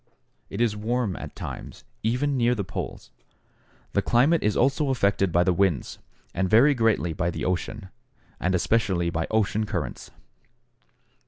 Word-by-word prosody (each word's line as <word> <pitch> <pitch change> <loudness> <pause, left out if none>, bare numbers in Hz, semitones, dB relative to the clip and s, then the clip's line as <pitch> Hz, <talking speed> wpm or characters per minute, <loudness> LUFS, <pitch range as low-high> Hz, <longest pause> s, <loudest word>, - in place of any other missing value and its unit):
It - - -4
is 115 -3 +2
warm 110 -1 -1
at - - -8
times, - - -8 0.2
even 125 +6 0
near 125 -1 +2
the 100 - -2
poles. - - -6 0.8
The - - +2
climate 145 +8 +3
is 105 -1 +1
also 140 +3 +2
affected 100 -7 +1
by 85 +1 +4
the 90 0 +2
winds, 90 -5 0 0.3
and 95 +1 0
very 125 +8 +6
greatly 115 - +1
by 85 +2 -1
the - - -4
ocean, 95 +2 -3 0.5
and 90 +1 +1
especially 90 -3 +1
by 80 0 -2
ocean 110 0 +1
currents. 85 - -4
105 Hz, 150 wpm, -25 LUFS, 90-120 Hz, 0.8 s, very